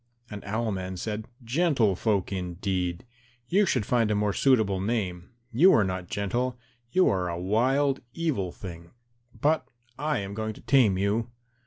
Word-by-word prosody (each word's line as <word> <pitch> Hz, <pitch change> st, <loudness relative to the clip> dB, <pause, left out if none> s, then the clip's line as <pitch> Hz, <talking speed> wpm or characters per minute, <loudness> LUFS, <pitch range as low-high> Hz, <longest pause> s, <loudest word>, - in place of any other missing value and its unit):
And 105 Hz, -1 st, -7 dB
Owl 110 Hz, +2 st, -1 dB
man 95 Hz, -1 st, -4 dB
said, 105 Hz, +3 st, -4 dB, 0.2 s
"Gentle 125 Hz, -, +2 dB
folk 100 Hz, -1 st, 0 dB
indeed! 90 Hz, 0 st, -2 dB, 0.4 s
You 200 Hz, +2 st, +3 dB
should 125 Hz, -10 st, +1 dB
find 115 Hz, -2 st, +2 dB
a 105 Hz, -, +1 dB
more 105 Hz, -1 st, +1 dB
suitable 110 Hz, -8 st, +3 dB
name; 95 Hz, -4 st, -2 dB, 0.2 s
you 165 Hz, +11 st, +6 dB
are 110 Hz, -, +5 dB
not 95 Hz, -1 st, -3 dB
gentle; 120 Hz, +5 st, -1 dB, 0.3 s
you 185 Hz, +7 st, +4 dB
are 90 Hz, -2 st, +1 dB
a 85 Hz, -, -3 dB
wild 130 Hz, +9 st, +2 dB
evil 135 Hz, -, -1 dB
thing, 85 Hz, -3 st, -9 dB, 0.5 s
but 145 Hz, -1 st, +1 dB, 0.3 s
I 150 Hz, +1 st, 0 dB
am 100 Hz, 0 st, -4 dB
going 110 Hz, +1 st, -3 dB
to -, -, -13 dB
tame 120 Hz, -9 st, +4 dB
you." 105 Hz, +4 st, 0 dB
105 Hz, 160 wpm, -27 LUFS, 95-125 Hz, 0.5 s, you